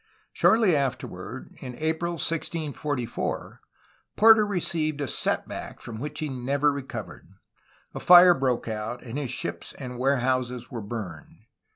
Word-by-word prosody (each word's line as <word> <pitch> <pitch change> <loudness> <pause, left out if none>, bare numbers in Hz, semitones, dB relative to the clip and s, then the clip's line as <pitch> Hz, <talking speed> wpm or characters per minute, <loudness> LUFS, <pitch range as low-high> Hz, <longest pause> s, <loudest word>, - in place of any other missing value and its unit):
Shortly 220 -7 +4
afterward, 140 -3 -4
in 125 -1 -7
April 160 +2 -1
1644, 150 -5 -3 0.5
Porter 220 -1 +7
received 160 -6 -1
a 145 - -2
set - - -1
back - - -7
from 115 -2 -7
which 150 +4 -5
he 155 - -1
never 140 +2 +1
recovered. 130 -9 -7 0.6
A - - -5
fire 180 0 +9
broke 130 -6 -1
out, 110 +2 -4
and 125 +4 -5
his 140 -4 -3
ships 130 - -4
and 125 -3 -7
warehouses 125 -2 0
were 115 - -4
burned. 100 -6 -7
135 Hz, 135 wpm, -26 LUFS, 120-160 Hz, 0.6 s, fire